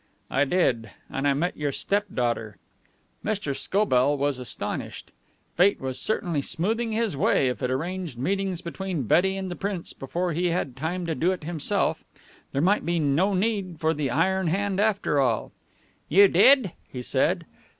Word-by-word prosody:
"I 140 +2 +3
did. 130 - +1 0.2
And 135 +1 -1
I 140 - +3
met 175 +6 -1
your 145 -1 -1
stepdaughter." 125 - -1 0.7
Mr. 200 -10 -2
Scobell 145 -5 +2
was 140 -1 0
astonished. 125 - -5 0.4
Fate 190 +4 +4
was 130 -1 -4
certainly 175 -8 -1
smoothing 225 +11 -1
his 220 -6 0
way 135 -1 +2
if 125 - -4
it 125 - 0
arranged 165 +1 -3
meetings 190 +5 -1
between 175 -3 -3
Betty 190 - +3
and 190 -1 -4
the - - -4
Prince 195 -3 -4
before 175 +6 -3
he 175 +3 +1
had 165 -7 -1
time 165 +6 -3
to 165 - -1
do 170 +4 +1
it 180 -4 -4
himself. 160 -1 -1 0.5
There 140 - 0
might 200 +4 +3
be 170 0 0
no 165 +6 +2
need 190 -4 -1
for 160 0 +2
the 145 -3 -2
iron 185 +7 +1
hand 195 +3 0
after 205 -8 +2
all. 120 -5 +1 0.6
"You 200 +5 +7
did?" 205 +3 +5 0.2
he 125 -1 -6
said. - - +1
170 Hz, 165 wpm, -26 LUFS, 140-195 Hz, 0.7 s, You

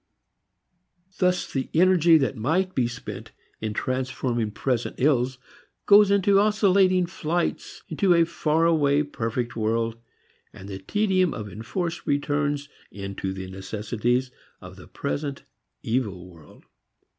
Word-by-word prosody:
Thus 180 -1 +1
the 135 -1 -2
energy 175 -1 +5
that 135 -2 0
might 165 +11 0
be 125 -2 +1
spent 120 - -8 0.3
in 110 -1 -4
transforming 130 -3 -2
present 120 +2 -2
ills 130 -2 +2 0.5
goes 205 0 +7
into 200 0 +4
oscillating 195 -3 +3
flights 170 -1 -3
into 175 +3 +2
a 170 0 +4
far 165 -1 0
away 150 -3 +3
perfect 120 -4 -3
world 115 +1 -1 0.5
and 95 - -11
the 95 -1 -6
tedium 185 - +1
of 110 -2 -6
enforced 165 - -4
returns 145 0 0 0.2
into 100 -1 -5
the 95 0 -6
necessities 110 +6 -2 0.3
of 90 -1 -11
the 95 - -13
present 140 0 -4 0.4
evil 105 -7 -2
world. 80 -4 -17
135 Hz, 120 wpm, -25 LUFS, 115-170 Hz, 0.5 s, goes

